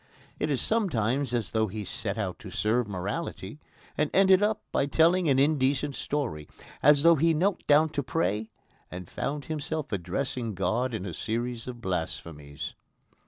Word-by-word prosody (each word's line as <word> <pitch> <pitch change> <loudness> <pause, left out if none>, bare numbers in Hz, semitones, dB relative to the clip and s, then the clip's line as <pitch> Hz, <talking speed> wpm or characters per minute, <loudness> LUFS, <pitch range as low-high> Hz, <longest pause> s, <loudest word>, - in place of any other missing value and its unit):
It 150 - 0
is 140 -4 +1
sometimes 140 - +1
as 120 -5 -1
though 110 -1 +1
he 105 +1 -5
set - - -3
out - - -3
to - - -9
serve 110 +2 +1
morality 100 - -4 0.4
and 150 0 +1
ended 190 0 +6 0.3
by 140 - +1
telling 165 +3 +3
an 135 - +4
indecent 140 0 +2
story 120 - -3 0.3
as 145 0 +6
though 170 0 +8
he 165 +2 +3
knelt 190 +5 0
down 155 +2 +5
to 145 - -2
pray 110 -7 -1 0.4
and 90 -1 -7
found 145 +8 -3
himself 155 -1 -3
addressing 115 +3 -2
God 110 +7 0
in 100 - -4
a 90 - -5
series 120 +5 -3
of 120 -2 -7
blasphemies. 80 -6 -4
130 Hz, 160 wpm, -28 LUFS, 105-150 Hz, 0.4 s, though